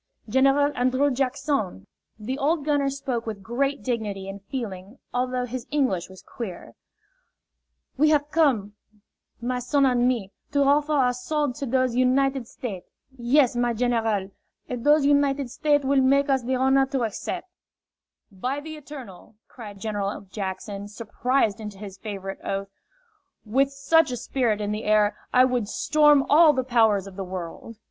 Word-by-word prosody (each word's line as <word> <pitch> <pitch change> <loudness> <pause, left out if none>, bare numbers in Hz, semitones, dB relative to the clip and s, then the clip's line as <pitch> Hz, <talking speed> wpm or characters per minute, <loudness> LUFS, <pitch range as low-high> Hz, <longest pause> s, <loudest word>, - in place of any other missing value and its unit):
"General 275 +5 +3
An 250 +1 +2
drrew 275 +3 +2
Jack 265 +1 -1
son," 265 - -2 0.3
the 250 +6 -4
old 295 +1 +1
gunner 290 -2 +2
jpoke 265 -4 -3
with 205 -3 -5
great 275 +6 -1
dignity 210 -6 -3
and 195 0 -7
feeling 205 -2 -6 0.2
although 250 0 -1
his 250 0 -6
English 255 - 0
was 190 0 -14
queer, 195 -8 -8 1.3
"we 305 +1 +5
haf 295 -1 +2
come, 255 -11 +2 0.7
my 250 +1 -1
son 275 +3 +2
an' 245 -2 +3
me, 225 -6 -1 0.2
to 285 -1 +3
hoffer 290 +2 +3
ou' 255 -4 +3
swo'de 280 +2 -1
to 275 - -3
dose 255 0 +1
United 260 0 +2
State'. 200 -9 -7 0.3
Yes, 250 +1 +3
my 240 0 +1
general. 225 -5 0 0.4
If 245 -1 -4
dose 295 +2 +4
United 280 -2 +2
State' 290 0 +1
will 275 0 +3
make 275 +2 +3
us 265 -1 +3
the 255 +2 -1
honah 265 +1 +3
to 270 -2 -1
haccep'." 230 - -3 0.9
"By 250 +9 -3
the 310 +1 -8
Eternal," 255 -9 -11
cried 210 -5 -10
General 205 -1 -3
Jackson, 200 +1 -6
surprised 225 +1 -1
into 210 -2 -7
his 195 -2 -9
favorite 195 -2 -6
oath, 195 0 -3 0.8
"with 270 +6 +2
such 280 +4 +3
a 250 - -3
spirit 235 -3 -1
in 205 0 -2
the 210 +1 -4
air, 210 -1 +3 0.2
I 255 0 +6
would 250 -4 -1
storm 295 +3 +4
all 310 +1 +6
the 260 -2 0
powers 225 -6 +3
of 195 -1 -11
the 195 - -3
world!" 185 +4 -7
250 Hz, 160 wpm, -25 LUFS, 210-275 Hz, 1.3 s, I